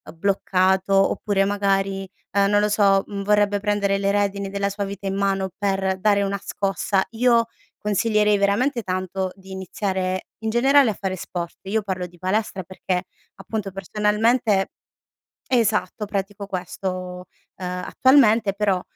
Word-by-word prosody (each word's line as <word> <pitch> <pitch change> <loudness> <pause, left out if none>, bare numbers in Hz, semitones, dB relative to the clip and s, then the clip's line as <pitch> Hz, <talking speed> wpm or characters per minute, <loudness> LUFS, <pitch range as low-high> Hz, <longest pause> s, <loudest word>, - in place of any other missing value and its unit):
bloccato, 190 +1 +2
oppure 200 -2 0
magari, 195 -1 0 0.3
uhm, 200 0 +4
non 205 0 +4
lo 210 - +2
so, 200 -2 +4
mhmm, 200 -1 -5
vorrebbe 205 0 +2
prendere 200 -1 +1
le 200 0 +1
redini 200 -1 0
della 200 0 -1
sua 200 +1 -3
vita 200 0 -7
in 195 - -1
mano 195 -1 0
per 195 -2 0
dare 200 0 +3
una 200 0 -2
scossa, 195 0 0
io 235 0 +3 0.3
consiglierei 210 0 +2
veramente 235 +6 +1
tanto 185 0 -2
di 190 -1 -14
iniziare, 190 0 -3 0.2
in 220 - 0
generale 265 +1 +5
a - - -4
fare 190 -1 -2
sport, 170 -1 -6
io 215 +3 0
parlo 190 -3 -3
di 175 0 -19
palestra 190 +1 -1
perché 185 0 -3 0.3
appunto 195 +1 -5
personalmente 210 +2 +1 0.8
esatto, 220 -3 +1
pratico 200 0 -4
questo, 185 -1 -5 0.3
ehm, 180 0 -4
attualmente 230 -6 +4
però, 200 -2 +1
200 Hz, 140 wpm, -23 LUFS, 190-210 Hz, 0.8 s, generale